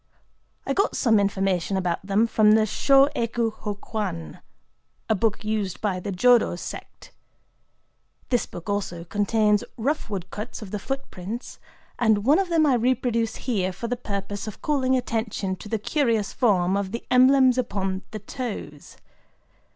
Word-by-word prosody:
I - - 0
got 400 +3 +1
some 225 -5 +4
information 195 -2 0
about 180 -2 -1
them 200 +3 +2
from 215 -2 +4
the 220 0 +5
Shō 275 +6 +4
Ekō 230 -1 -1
Hō 205 -2 -6
Kwan,—a 85 - -6
book 215 +1 0
used 210 -4 -2
by 195 -4 -1
the 195 - -5
Jodo 240 +1 +4
sect. - - -9 1.2
This 245 -2 +1
book 175 +1 -10
also 200 -4 -2
contains 210 +3 +1
rough 275 +3 -1
woodcuts 205 +4 -6
of 195 - -10
the 210 - -3
footprints; 235 -3 -6 0.4
and 220 -3 +3
one 295 +7 +5
of 385 -2 -1
them 325 -2 +3
I 280 - +4
reproduce 235 -2 +1
here 195 -7 -1
for 235 +6 -6
the 245 - -1
purpose 200 -2 -5
of 215 - -7
calling 260 -3 +2
attention 220 -5 -2
to 210 - -10
the 225 - 0
curious 225 -3 0
form 190 -6 +2
of 200 -1 -2
the 235 - -5
emblems 255 0 +5
upon 195 -5 -2
the 215 - -6
toes. 230 +2 -7
215 Hz, 150 wpm, -24 LUFS, 195-245 Hz, 1.2 s, the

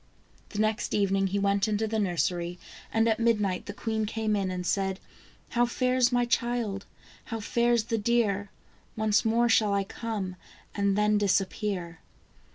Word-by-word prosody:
The 205 - -8
next 215 0 0
evening 195 -1 +2
he 195 +2 -1
went 200 +1 +2
into 215 +1 0
the 220 0 -1
nursery, 175 -2 -1 0.3
and 225 0 +2
at 220 0 +2
mid 230 -2 +3
night 190 -3 -2
the - - -3
queen 220 0 -2
came 220 -1 -1
in, 195 -2 0
and 180 -1 -4
said: 190 0 0 0.3
" - - -29
How 240 0 +2
fares 250 0 +2
my 245 0 +2
child? 235 -4 -1 0.4
how 225 -2 -4
fares 235 +1 +2
the 225 0 -1
deer? 205 -3 +1 0.5
Once 215 -1 +2
more 230 +2 +3
shall 215 -3 +3
I 200 - +1
come, 195 -3 -5 0.4
and 200 -1 +1
then 210 0 +3
disappear." 195 -3 -1
210 Hz, 165 wpm, -28 LUFS, 195-230 Hz, 0.5 s, mid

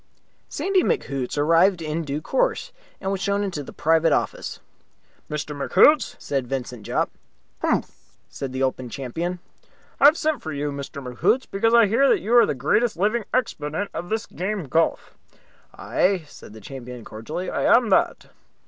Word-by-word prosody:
Sandy 385 -1 +1
McHoots 140 - -2
arrived 165 +5 +4
in 160 +1 -3
due 150 0 -3
course, - - 0 0.3
and 190 - -2
was 195 -1 -2
shown 200 0 0
into 185 -7 -3
the 140 - -9
private 165 +1 +2
office. - - -1 0.7
"Mr. 150 0 -4
McHoots?" 265 - +4
said 135 -3 -3
Vincent 125 -4 -5
Jopp. - - 0 0.5
"Mphm!" - - +1 0.4
said 135 -2 -6
the 130 +1 -2
Open 130 -1 -2
Champion. 160 +9 -4 0.6
"I - - +5
have 300 +3 +8
sent 310 -5 0
for 160 - -5
you, 145 0 -2
Mr. 140 0 -7
McHoots, 220 - +1
because 225 +4 +2
I 235 -1 +7
hear 245 +7 +3
that - - +4
you 225 +4 +1
are 240 - +7
the - - -1
greatest 210 - +1
living 210 +4 +1
exponent 200 -6 -2
of 175 - -5
this 220 +1 -1
game 195 +3 -3
of 145 - -10
golf." 165 0 0 0.6
"Aye," 185 -3 0
said 105 - -13
the 110 - -12
champion, 125 0 -9
cordially. 150 +12 -5
"I - - -1
am 235 -2 +5
that." 190 - +1
165 Hz, 170 wpm, -23 LUFS, 140-215 Hz, 0.7 s, have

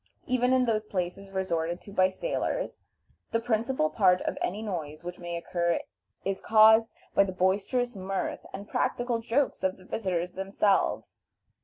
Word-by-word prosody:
Even 250 0 +2
in 260 -1 +4
those 220 -2 +1
places 195 -1 -4
resorted 175 -3 -1
to 200 - -12
by 185 -1 +4
sailors, - - -3 0.5
the 230 - +1
principal 230 -6 0
part 185 -3 +4
of - - -2
any 205 +5 -2
noise 160 -7 -5
which 175 +1 -6
may 175 -1 -5
occur 170 0 0 0.5
is 195 0 -1
caused 220 +1 +6 0.2
by - - +6
the 195 - -3
boisterous 200 +7 +1
mirth 195 0 -3
and 200 +1 -7
practical 245 -2 0
jokes 240 +5 0
of 190 0 0
the 185 - -17
visitors 180 -4 -2
themselves. 195 +1 0
195 Hz, 155 wpm, -28 LUFS, 180-230 Hz, 0.5 s, caused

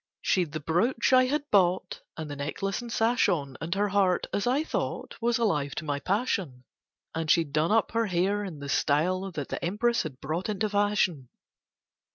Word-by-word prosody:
She'd 175 -5 +1
the 155 - -2
brooch 220 - +1
I 255 0 +7
had 290 +3 -1
bought 185 -2 +2 0.2
And 160 -1 -5
the 145 - -6
necklace 190 - -3
and 240 -1 -8
sash 235 +2 +2
on, 140 -6 -1
And 170 +3 -2
her 205 +1 +1
heart, 190 -2 +2
as 200 - 0
I 270 +5 +2
thought, - - -3
Was 235 0 +2
alive 150 - 0
to 155 - -4
my 145 -1 -1
passion; 185 - -1 0.5
And 160 -1 -3
she'd 160 -4 +3
done 155 +4 +2
up 225 0 +2
her 230 0 +1
hair 195 +3 +1
in 180 -6 -6
the 140 0 -7
style 180 +8 +1
that 145 -3 -5
the - - -4
Empress 225 +7 +1
had 140 -5 -7
brought 160 +8 -3
into 210 +1 -1
fashion. 205 - +1
185 Hz, 195 wpm, -28 LUFS, 155-215 Hz, 0.5 s, I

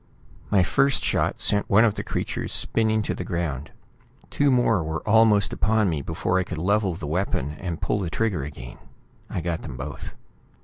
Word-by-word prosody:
My 100 -3 +4
first 135 +8 +2
shot - - 0
sent 100 0 +2
one 110 +4 +6
of 110 - +2
the - - -4
creatures - - -3
spinning 110 -1 +1
to - - -2
the - - -5
ground. 80 -6 -3 0.6
Two 145 0 +2
more 120 -7 +3
were 80 +3 -5
almost 105 -2 +4
upon 110 -3 +2
me 75 -3 -2
before 85 +5 -1
I - - +1
could - - -6
level 95 +2 +1
the 80 - -7
weapon 75 -3 -1
and 85 -3 -4
pull 105 - -1
the 90 -4 -2
trigger 95 -6 -1
again. 70 +1 -9 0.5
I 90 - -3
got 85 0 -2
them 65 -5 -8
both. 70 +4 -7
95 Hz, 185 wpm, -24 LUFS, 80-110 Hz, 0.6 s, one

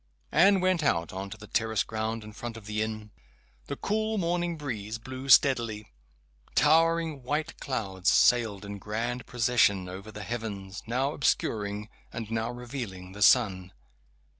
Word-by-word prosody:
Anne 195 -1 +5
went 185 -2 +2
out 85 - +1
on 95 +1 -5
to - - -8
the 105 - -11
terrace 110 0 0
ground 110 0 -3
in 105 0 -10
front 115 +1 -6
of 110 - -12
the 105 0 -2
inn. 110 -1 -4 0.6
The 140 - -3
cool 220 +6 -1
morning 175 -2 0
breeze 115 -7 -4
blew 130 +3 -8
steadily. 115 -5 +4 0.6
Towering 165 -1 +3
white 150 +6 -3
clouds 100 -8 -1
sailed 110 -5 +3
in 100 0 -6
grand 120 +4 -3
procession 115 -6 +2
over 95 +4 -8
the 105 0 -7
heavens, 105 -4 -5
now 130 +5 0
obscuring, 105 -6 0 0.2
and 115 -2 -6
now 115 0 -1
revealing 120 -7 -6
the 105 +2 -10
sun. 95 -5 +4
115 Hz, 150 wpm, -28 LUFS, 105-135 Hz, 0.6 s, Anne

